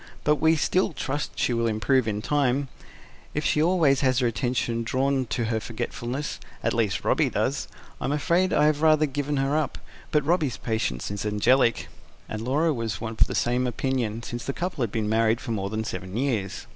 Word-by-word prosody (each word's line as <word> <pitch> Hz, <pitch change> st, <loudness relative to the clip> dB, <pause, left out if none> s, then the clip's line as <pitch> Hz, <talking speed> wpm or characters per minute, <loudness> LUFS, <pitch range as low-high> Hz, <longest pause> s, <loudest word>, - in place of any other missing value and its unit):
"But 150 Hz, 0 st, +3 dB
we 160 Hz, +1 st, +4 dB
still 180 Hz, +3 st, +1 dB
trust 145 Hz, +1 st, -3 dB
she 125 Hz, -, +1 dB
will 115 Hz, 0 st, +1 dB
improve 115 Hz, +3 st, +2 dB
in 105 Hz, 0 st, -2 dB
time, 140 Hz, -1 st, +1 dB, 0.7 s
if 150 Hz, -, -1 dB
she 150 Hz, -, +2 dB
always 160 Hz, -5 st, +3 dB
has 130 Hz, -2 st, +2 dB
her 125 Hz, -, +2 dB
attention 120 Hz, 0 st, 0 dB
drawn 130 Hz, +2 st, 0 dB
to 120 Hz, +1 st, -1 dB
her 110 Hz, 0 st, 0 dB
forgetfulness 120 Hz, +5 st, -4 dB, 0.2 s
at -, -, +1 dB
least 110 Hz, -4 st, 0 dB
Robby -, -, +3 dB
does; -, -, -1 dB, 0.3 s
I'm 135 Hz, -, -1 dB
afraid 170 Hz, +5 st, +2 dB
I -, -, +4 dB
have 150 Hz, -1 st, +2 dB
rather 155 Hz, -1 st, +5 dB
[P.165] 140 Hz, -, -8 dB
given 145 Hz, 0 st, -1 dB
her 135 Hz, +2 st, +1 dB
up. 155 Hz, -4 st, -1 dB, 0.3 s
But 150 Hz, -2 st, +1 dB
Robby's 150 Hz, -, +1 dB
patience 105 Hz, -, -2 dB
is 100 Hz, -1 st, -4 dB
angelic." 110 Hz, -2 st, +2 dB, 0.4 s
And 110 Hz, -, -5 dB
Laura 150 Hz, +7 st, +1 dB
was 115 Hz, -4 st, -3 dB
of 115 Hz, -1 st, -5 dB
the -, -, -4 dB
same 125 Hz, +1 st, +1 dB
opinion, 120 Hz, -2 st, -2 dB
since 120 Hz, 0 st, -5 dB
the 135 Hz, -, -3 dB
couple 175 Hz, -3 st, -3 dB
had 115 Hz, -4 st, 0 dB
been 110 Hz, -2 st, -1 dB
married 110 Hz, +1 st, +2 dB
for 130 Hz, -3 st, -5 dB
more 100 Hz, -3 st, -2 dB
than 110 Hz, +1 st, -2 dB
seven 95 Hz, -2 st, -5 dB
years. 120 Hz, -8 st, -1 dB
125 Hz, 195 wpm, -26 LUFS, 110-145 Hz, 0.7 s, rather